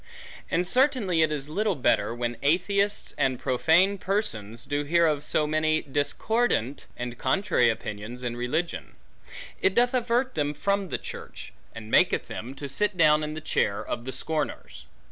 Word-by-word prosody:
And 175 +1 0
certainly 250 - +2
it 155 -1 +3
is 145 -2 -3
little 205 +5 0
better, 115 -6 +2
when 120 0 -2
atheists, 200 +7 +1
and 135 -2 +2
profane 165 +9 +3
persons, 115 - -2
do 145 0 -1
hear 170 +3 +3
of 150 -2 +1
so 150 0 +1
many 155 +1 +1
discordant, 145 - 0
and 125 0 -5
contrary 190 - +2
opinions 110 +2 -5
in 120 -1 -2
religion; 150 +8 -3 0.7
it 190 - +2
doth 245 +1 +4
avert 250 +1 +1
them 145 0 -1
from 200 +4 -1
the - - -1
church, - - -9 0.2
and 110 -1 -9
maketh - - +3
them, 125 +4 -7
to 140 - -6
sit 205 +7 0
down 155 -2 +5
in 150 0 -4
the 155 - -5
chair 100 -9 0
of 120 - -4
the 130 - -3
scorners. 150 - -4
155 Hz, 165 wpm, -26 LUFS, 125-195 Hz, 0.7 s, down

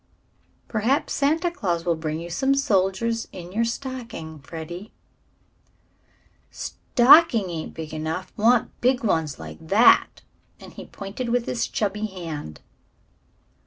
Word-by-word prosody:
"Perhaps 235 +6 0
Santa 320 +5 +1
Claus 175 - -2
will 170 - +2
bring 160 0 -3
you 170 +1 -7
some 270 +10 +2
soldiers 225 -1 +1
in 175 -1 -9
your 225 +4 +1
stocking, 230 - -5
Freddie." 170 +7 -8 1.6
"Stocking 245 - +4
ain't 160 -2 -6
big 160 -1 -7
enough 160 +4 -4
want 230 +2 +3
big 255 +1 +2
ones, 160 -8 0
like 80 -1 -9
that," 210 +7 +5 0.4
and - - -12
he - - -10
pointed 200 +5 -6
with 240 0 +1
his 230 -1 -1
chubby 210 +1 -2
hand. 165 - -7
200 Hz, 125 wpm, -24 LUFS, 165-240 Hz, 1.6 s, that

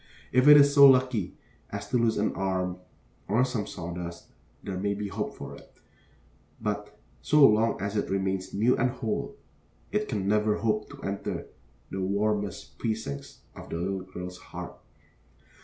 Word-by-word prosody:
If 130 +2 +4
it 150 0 +11
is 140 0 +6
so 140 -1 +9
lucky 125 -7 +2 0.3
as - - -6
to 125 - +2
lose 115 -1 +2
an 105 - +1
arm 95 -1 -1 0.5
or 115 +5 +3
some 115 -5 -3
sawdust, 85 -1 -7 0.3
there 95 -2 -4
may 100 +1 0
be 100 0 -4
hope - - -3
for - - -8
it; - - -16 0.9
but - - -4 0.2
so 150 -2 +6
long 110 +2 +2
as 100 +2 -3
it 105 - -1
remains 95 -1 -1
new 115 +5 +3
and 125 - +2
whole, 115 -4 -3 0.6
it 210 +1 -1
can 100 -2 -2
never 105 +1 +2
hope 110 -2 -1
to - - -12
enter 100 0 -3 0.5
the 95 - -3
warmest 100 0 -1
precincts 110 -12 -4
of - - -10
the - - -4
little 95 +2 -2
girl's 90 -1 -8
heart. - - -8
105 Hz, 160 wpm, -28 LUFS, 95-115 Hz, 0.9 s, it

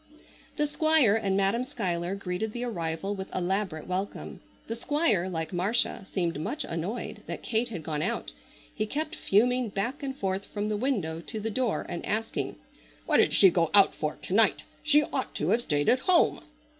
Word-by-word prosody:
The 295 - +2
Squire 310 -6 +4
and 200 -3 +1
Madam 200 +5 +2
Schuyler 190 -9 -2
greeted 200 +2 -3
the 240 - -4
arrival 175 -4 -2
with 190 -1 -6
elaborate 185 -3 -1
welcome. 190 +2 -4 0.2
The 230 - -4
Squire 235 - +1
like 160 -1 -4
Marcia 195 +2 0
seemed 170 -5 -1
much 305 - -3
annoyed 170 +8 -4
that - - -6
Kate 230 +2 0
had 180 -8 -6
gone 150 -1 -3
out. - - -2 0.4
He 215 - -2
kept 310 +6 -3
fuming 245 +4 +2
back 235 +9 -3
and 270 -1 -4
forth 195 -2 -2
from 210 0 -3
the 210 - 0
window 205 - -1
to 220 +5 -6
the 220 +1 -3
door 245 -1 -1
and 170 - -5
asking: 225 +1 -2 0.5
"What - - +3
did - - +5
she 190 - +7
go 165 -2 +2
out 200 -1 +7
for 155 -1 -3
to - - -6
night? 215 0 +4 0.2
She 300 -1 +4
ought - - -4
to - - -1
have 235 - +3
stayed 145 -9 0
at 250 - +4
home!" 345 +6 +3
205 Hz, 185 wpm, -28 LUFS, 180-245 Hz, 0.5 s, she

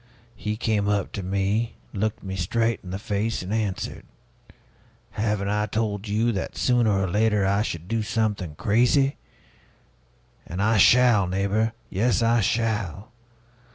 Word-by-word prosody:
He 105 0 -3
came 110 -3 0
up 100 -1 0
to 100 - -4
me, 100 +5 -1 0.2
looked 110 0 -2
me 95 -1 -5
straight 115 +5 0
in 90 - -9
the 95 - -3
face, 105 0 -2
and 95 +4 -4
answered: 105 -4 -2 1.1
'Haven't 105 -2 -1
I 105 +1 0
told 105 -2 -2
you 110 +3 +1
that, 95 -4 -4
sooner 120 -3 +2
or 95 -2 +1
later, 105 +1 +2
I 100 +1 +2
should 85 -5 -4
do 115 +2 -1
something 105 -7 -2
crazy? 125 - +2 1.3
And 90 - -6
I 110 +2 +3
shall, 115 -2 +5
neighbor, 100 +4 0 0.2
yes, 115 +5 +1
I 115 0 +3
shall! 105 -3 -1
105 Hz, 145 wpm, -24 LUFS, 100-115 Hz, 1.3 s, shall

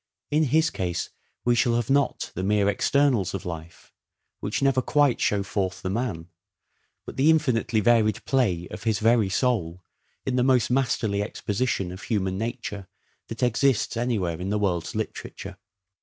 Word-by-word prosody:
In 155 +1 +3
his 160 +4 +2
case 85 -2 -3 0.3
we 120 - +4
shall 120 0 +2
have 120 +1 -1
not 140 +1 +1
the 90 - -4
mere 100 +1 +2
externals 110 -2 +2
of 95 - -6
life, 85 -1 -8 0.5
which - - -2
never 135 -2 +3
quite 145 -2 +2
show 100 -1 +1
forth 95 -1 -3
the 95 - -2
man, 100 -7 -3 0.8
but - - -9
the 140 +4 +4
infinitely 120 -8 +2
varied 110 -2 +2
play 95 -11 +1
of - - -8
his 110 -2 +1
very 115 -1 +3
soul 95 -6 0 0.4
in 130 -1 0
the 125 - +3
most 125 -2 +3
masterly 120 -6 +1
exposition 105 -2 -2
of 90 +2 -9
human 95 -2 -1
nature 110 -4 -4 0.4
that 115 +3 -5
exists 125 0 +2
anywhere 105 -8 -1
in 95 - -3
the 105 - +1
world's 90 -5 -1
literature. - - -5
110 Hz, 160 wpm, -25 LUFS, 95-125 Hz, 0.8 s, we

